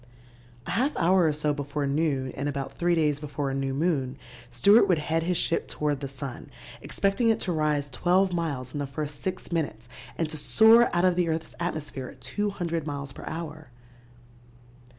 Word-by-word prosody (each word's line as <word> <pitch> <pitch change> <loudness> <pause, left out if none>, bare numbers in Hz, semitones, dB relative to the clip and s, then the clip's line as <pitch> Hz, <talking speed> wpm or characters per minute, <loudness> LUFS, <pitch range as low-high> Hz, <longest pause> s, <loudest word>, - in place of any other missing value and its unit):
A - - -4
half 270 +7 0
hour 180 0 +4
or - - +3
so 150 0 0
before 145 0 -3
noon 140 -2 0
and 140 +2 -3
about 140 -1 -4
three 175 0 +1
days 150 -3 +1
before 145 -2 -3
a - - -3
new 135 0 -1
moon, 135 -3 0 0.3
Stewart 200 - +5
would 180 -3 +3
head 160 +2 0
his 175 +1 0
ship 165 - 0
toward 150 -2 -1
the 140 - -4
sun, 135 -1 -7 0.3
expecting 200 +4 +1
it 225 - +2
to 180 - -1
rise 150 -3 0
twelve 180 +6 +2
miles 140 -7 -3
in 145 - -3
the 140 - -2
first 145 +1 -5
six 185 - -4
minutes 145 -9 -2 0.3
and 165 - 0
to 155 - -3
soar 225 +9 +6
out 175 +1 +2
of 180 -1 +3
the 175 -2 +1
earth's 160 0 -3
atmosphere 150 -6 -4
at - - -12
200 170 - -2
miles 140 -1 -4
per - - -10
hour. 155 -3 -6
155 Hz, 190 wpm, -27 LUFS, 140-175 Hz, 0.3 s, soar